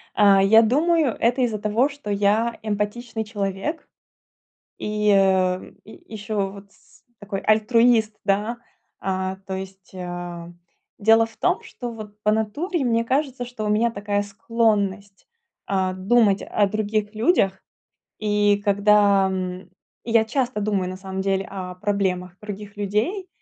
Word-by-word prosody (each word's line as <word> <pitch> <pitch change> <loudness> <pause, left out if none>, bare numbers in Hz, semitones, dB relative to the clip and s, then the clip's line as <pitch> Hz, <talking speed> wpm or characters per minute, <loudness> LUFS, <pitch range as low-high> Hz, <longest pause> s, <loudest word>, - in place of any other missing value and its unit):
А, 200 -2 +5
я 220 +3 +7
думаю, 295 +3 +2
это 245 +3 +2
из-за 230 -4 +1
того, 215 +7 +1
что 280 -7 -7
я 210 +4 +1
эмпатичный 220 +2 -3
человек. 205 - -4 0.9
И, 210 0 0
э, 190 -2 +2
и 220 - -15
ещё 205 -2 -2
вот 200 0 -13
с - - -25 0.2
такой 200 -1 -5
альтруист, 220 0 +3
да. 210 +4 0 0.4
А, 190 0 -2
то 190 - -4
есть, 190 0 -8
э, 175 -2 -6 0.5
дело 225 +2 +5
в 225 - -18
том, 360 +1 0
что 245 -2 -7
вот, 210 -2 -10
по 210 - +3
натуре, 270 - -1
мне 230 -1 +1
кажется, 265 0 -1
что 240 -3 -6
у 210 - -1
меня 225 +3 +2
такая 205 -1 -2
склонность, 205 -1 -1 0.4
э, 190 -1 0
думать 200 +1 +3
о 205 -1 +1
других 215 0 -1
людях. 215 - +2 0.6
И 205 -1 +2
когда, 200 -1 +4
м, 185 -1 -5 0.3
я 230 -1 +3
часто 245 -2 -1
думаю 200 -3 0
на 185 - -7
самом 190 0 -5
деле 195 0 -1
о 185 -2 -6
проблемах 185 -2 -2
других 205 0 -8
людей 215 - -1
210 Hz, 140 wpm, -23 LUFS, 195-225 Hz, 0.9 s, я